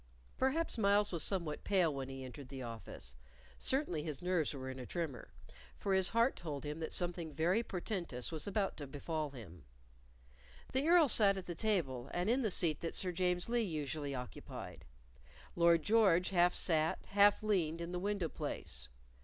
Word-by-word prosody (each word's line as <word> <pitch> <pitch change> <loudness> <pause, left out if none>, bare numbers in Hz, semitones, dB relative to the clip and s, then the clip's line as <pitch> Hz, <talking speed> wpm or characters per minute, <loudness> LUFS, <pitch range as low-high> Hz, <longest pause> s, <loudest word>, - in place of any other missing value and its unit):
Perhaps 265 0 0
Myles 205 0 +3
was 170 -3 -1
somewhat 170 -5 -2
pale 180 -6 +2
when 135 -1 -5
he 135 0 -7
entered 130 +1 -9
the 135 -1 -6
office; 115 - -8 0.5
certainly 265 - 0
his 150 -3 -4
nerves 180 -3 0
were 130 -2 -6
in 130 0 -6
a 125 - -6
tremor, 160 -9 -4 0.5
for 195 - -1
his 190 -1 +3
heart 230 +3 +3
told 150 -5 -5
him 150 +2 -4
that 160 - -4
something 175 -2 -2
very 170 +9 +2
portentous 175 - -4
was 160 +1 -4
about 200 -1 0
to 145 - -6
befall 155 +2 -3
him. 95 - -11 1.1
The 265 +4 +1
Earl 340 -2 +6
sat 205 -4 +5
at 190 - -5
the 175 - -4
table, 160 - -1
and 180 +5 +1
in 260 +3 +2
the 220 - +1
seat 170 -4 +3
that 165 - -4
Sir 185 - +1
James 180 0 0
Lee 240 0 +1
usually 150 -6 -3
occupied; 125 -1 -8 0.7
Lord 170 -1 +4
George 195 -5 +4
half 175 -1 +4
sat, 160 -2 +2
half 205 +1 +5
leaned 170 -7 +1
in 170 +1 -5
the 180 - -2
window 200 -2 -1
place. 65 - -5
170 Hz, 180 wpm, -35 LUFS, 145-200 Hz, 1.1 s, Earl